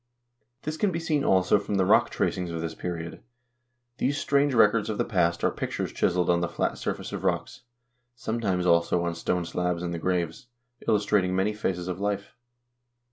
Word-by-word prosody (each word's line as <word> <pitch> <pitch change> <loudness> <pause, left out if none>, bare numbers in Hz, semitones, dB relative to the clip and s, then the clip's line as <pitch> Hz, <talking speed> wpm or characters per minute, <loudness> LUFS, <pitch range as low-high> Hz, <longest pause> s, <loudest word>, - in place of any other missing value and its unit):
This 155 +1 -3
can 205 +2 +1
be 165 - -2
seen 155 -3 0
also 95 +2 +4
from 100 0 -3
the 95 -1 +3
rock 110 +5 +5
tracings 90 -2 -1
of 85 -1 -4
this 80 0 -3
period. 85 -2 -5 0.8
These 140 +3 +1
strange 140 -1 +2
records 110 -1 +4
of 105 - -2
the - - +1
past 85 -6 +1
are - - +3
pictures - - -4
chiseled 90 0 +1
on 85 -1 +3
the 85 - -1
flat 85 - -2
surface - - -4
of - - -4
rocks, - - -1 0.5
sometimes, 110 -6 -1
also, 85 0 +3
on 85 0 -1
stone 85 +1 -1
slabs 90 0 -1
in 85 - -2
the 85 - -3
graves, 90 +3 -2 0.4
illus 105 -1 +2
trating 95 -3 +2
many 95 +3 +1
phases 90 -4 -2
of 90 0 -3
life. 100 0 -2
95 Hz, 190 wpm, -27 LUFS, 85-110 Hz, 0.8 s, rock